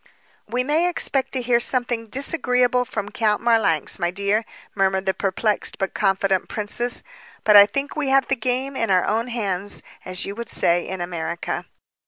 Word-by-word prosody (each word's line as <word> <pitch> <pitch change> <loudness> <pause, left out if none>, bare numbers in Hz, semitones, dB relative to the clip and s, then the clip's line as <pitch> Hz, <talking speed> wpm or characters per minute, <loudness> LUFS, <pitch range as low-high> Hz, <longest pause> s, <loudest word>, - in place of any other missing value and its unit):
"We 245 +3 -1
may 315 +6 +2
expect 270 -6 0
to 255 -2 0
hear 240 0 +3
something 240 -2 0
disagreeable 250 -1 +2
from 210 -5 -4
Count 210 -2 +1
Marlanx, 220 -10 +1
my 175 - +1
dear," 200 +4 0 0.3
murmured 190 -1 +1
the 190 - +1
perplexed, 205 +3 -1
but 195 -1 -2
confident 195 -1 +1
princess, 235 +3 -1 0.4
"but 210 - +5
I 205 0 +10
think 275 +6 -3
we 300 -2 -1
have 270 0 +3
the 270 - +1
game 255 +3 -2
in 230 -4 -1
our 185 -2 +3
own 225 +3 0
hands, 205 -5 -3 0.2
as 185 0 -3
you 200 - -5
would 235 +1 -7
say 175 0 +1
in 190 -1 -5
America." 170 -1 -4
220 Hz, 175 wpm, -22 LUFS, 195-250 Hz, 0.4 s, I